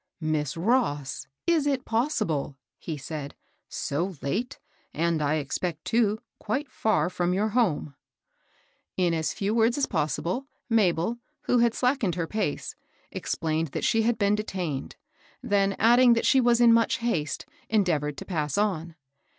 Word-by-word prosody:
" - - -56
Miss 155 -2 -1
Ross! 155 - 0 0.2
is 325 -4 +2
it 275 -2 0
possible? 215 - -1
*' - - -63
he 160 -3 -2
said; 145 0 -6 0.2
'' - - -53 0.2
so 175 +6 -1
late, 235 - -2 0.4
and 165 0 +1
I 150 +1 +1
expect, 155 +2 -3
too, 220 -2 +2 0.2
quite 260 +6 -3
far 215 -4 +1
from 180 0 0
your 210 +3 +1
home? 200 - +1 0.5
" - - -36 0.3
In 180 -2 +2
as 160 -2 0
few 200 +2 -1
words 230 +2 +3
as 280 - +2
possible, 170 - -2 0.2
Mabel, 220 -1 +2 0.2
who 250 - +2
had 235 -1 +3
slackened 250 - +1
her 170 -2 -1
pace, 200 -3 -3 0.4
explained 160 0 -1
that - - -3
she 225 - +3
had 230 0 +1
been 200 -1 +2
detained; 185 -9 -3 0.5
then, 200 -1 +2
adding 240 +2 +6
that 230 - 0
she 265 - +5
was 240 -1 +3
in 235 -1 +7
much 230 0 +3
haste, 175 -11 -2 0.2
endeavored 160 -9 +1
to - - -7
pass 150 -6 -2
on. 175 -6 -1
195 Hz, 160 wpm, -27 LUFS, 155-235 Hz, 0.5 s, in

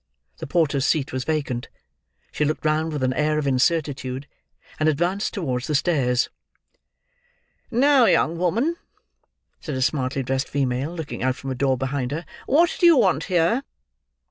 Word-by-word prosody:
The - - -6
porter's 145 -4 +1
seat 145 -5 0
was 130 -1 -3
vacant. 140 -6 -2 0.6
She - - -1
looked 155 +1 -2
round 155 +1 +1
with 145 -3 -3
an 130 0 +1
air 150 +2 +1
of 150 - -1
incertitude, 135 -1 0 0.5
and 155 0 +3
advanced 175 +7 0
towards 130 - -3
the 150 - 0
stairs. 135 -6 +1 1.4
"Now, 265 +1 +4
young 165 -6 +3
woman!" 230 - 0 0.8
said 150 - -5
a 130 - -2
smartly 135 -1 -1
dressed 130 +1 -2
female, 135 +1 -1
looking 160 -4 -6
out 130 0 +1
from 135 +1 -6
a - - -2
door 130 0 +1
behind 135 0 -2
her, 160 +4 -4 0.2
"who 325 +5 +5
do 350 - +6
you 335 -3 +7
want - - +2
here?" 180 +6 +2
150 Hz, 160 wpm, -23 LUFS, 130-170 Hz, 1.4 s, you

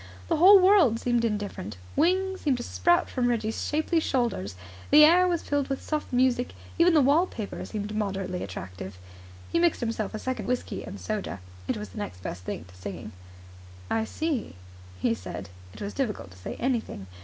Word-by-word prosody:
The - - +2
whole 385 +4 +9
world 365 - +5
seemed 240 -1 +1 0.2
different. 105 - -6 0.2
Wings 375 +4 +2
seemed 275 -4 +2
to 240 - -5
sprout 345 +6 +2
from 250 -2 0
Reggie's 225 -2 -1
shapely 315 +3 +1
shoulders. 235 - -1 0.3
The 300 +1 +9
air 355 +3 +6
was 345 -2 0
filled 285 -1 0
with 270 -1 -2
soft 305 -1 -3
music. 250 0 +2 0.2
Even 340 0 +6
the 300 - +6
wallpaper 280 - +1
seemed 210 -1 -4
moderately 195 -3 -2
attractive. 95 0 -7 0.5
He - - +2
mixed 345 -1 +3
himself 225 -3 -2
a - - -2
second 260 +3 -3
whisky 250 0 -2
and 200 - -8
soda. 210 - -3 0.3
It - - 0
was 210 0 -6
the - - -8
next 90 - -6
best 90 +1 -6
thing 85 - -5
to 90 0 -17
singing. 100 +3 -7 0.8
"I 225 0 +1
see," 305 - -2 0.4
he 115 - +2
said. 95 -1 -7 0.2
It - - -12
was 205 0 -4
difficult 225 - -3
to 90 - -15
say - - -6
anything. 235 - -2
240 Hz, 180 wpm, -27 LUFS, 195-305 Hz, 0.8 s, whole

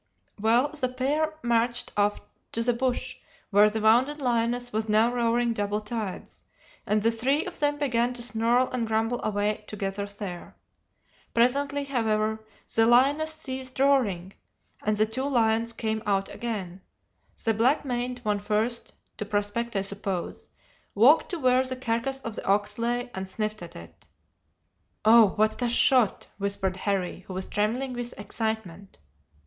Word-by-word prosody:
"Well, 235 +6 +3
the 290 -4 -2
pair 295 +5 -1
marched 235 0 0
off 205 0 +1 0.3
to 230 - 0
the 245 +1 +2
bush, 250 +1 -2 0.3
where 205 +1 +6
the 220 +1 -3
wounded 250 +7 +3
lioness 245 -1 0
was 220 0 -1
now 220 +3 +3
roaring 235 0 +1
double 205 -1 -1
tides, 215 -2 -6 0.5
and 210 0 +1
the 230 - +4
three 260 +6 +1
of 360 -1 -7
them 290 0 +1
began 245 -4 +1
to 240 - -3
snarl 240 +2 +2
and 240 -3 -2
grumble 225 +2 0
away 210 0 -1
together 200 -1 -3
there. 200 -4 -7 0.8
Presently, 280 +4 +2
however, 220 -5 -1 0.3
the 225 0 +4
lioness 280 +6 +4
ceased 260 -4 -5
roaring, 210 -10 +2 0.5
and 210 0 0
the 215 - +4
two 225 +4 -2
lions 230 -4 +2
came 220 -1 -2
out 195 -1 +1
again, 195 -6 -5 0.6
the 225 - +3
black 255 +8 +2
maned 245 -1 -3
one 210 -1 0
first 215 +3 -1 0.2
to 210 - -4
prospect, 205 +3 -2
I 195 - +1
suppose 195 -2 -4 0.5
walked 255 +10 +5
to 355 - -3
where 255 -3 +3
the 260 0 -1
carcass 255 +2 -2
of 225 -3 -5
the - - -6
ox 205 +2 +1
lay, 245 +1 -1
and 190 0 -5
sniffed 215 +1 -3
at 170 - -9
it. 85 0 -13 1.0
"'Oh, 225 0 +8
what 215 +3 +1
a 245 - +1
shot!' 240 -2 +3
whispered 195 -2 -1
Harry, 190 -3 -2
who 185 - -7
was 185 - -4
trembling 240 +6 -1
with 245 -2 -5
excitement. 205 -3 -4
230 Hz, 155 wpm, -26 LUFS, 210-250 Hz, 1.0 s, Oh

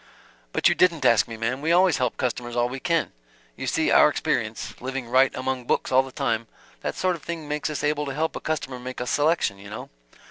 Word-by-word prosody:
"But - - +3
you - - +4
didn't 170 -4 +2
ask 115 -3 +5
me, 115 - -7
ma'm. 125 +4 -2
We 160 +2 +1
always 180 -3 +4
help 125 -3 -1
customers 120 -1 -3
all 120 0 +2
we 130 +2 -6
can. 165 +1 0 0.4
You - - -5
see - - +1
our - - +7
experience - - -2
living 130 -1 -4
right 130 +3 +4
among 130 -1 -3
books - - 0
all 130 +1 +6
the 135 0 -9
time 115 -5 -1 0.3
that - - -3
sort 185 -1 +1
of 165 - -11
thing 165 -2 -6
makes 150 +1 -2
us 155 - -4
able 150 0 0
to 135 - -3
help 160 +2 -1
a - - -3
customer 135 -5 -3
make 130 +1 -7
a 125 - -2
selection, 145 - +1
you 100 +1 -11
know." 110 - -8
135 Hz, 235 wpm, -25 LUFS, 125-155 Hz, 0.4 s, our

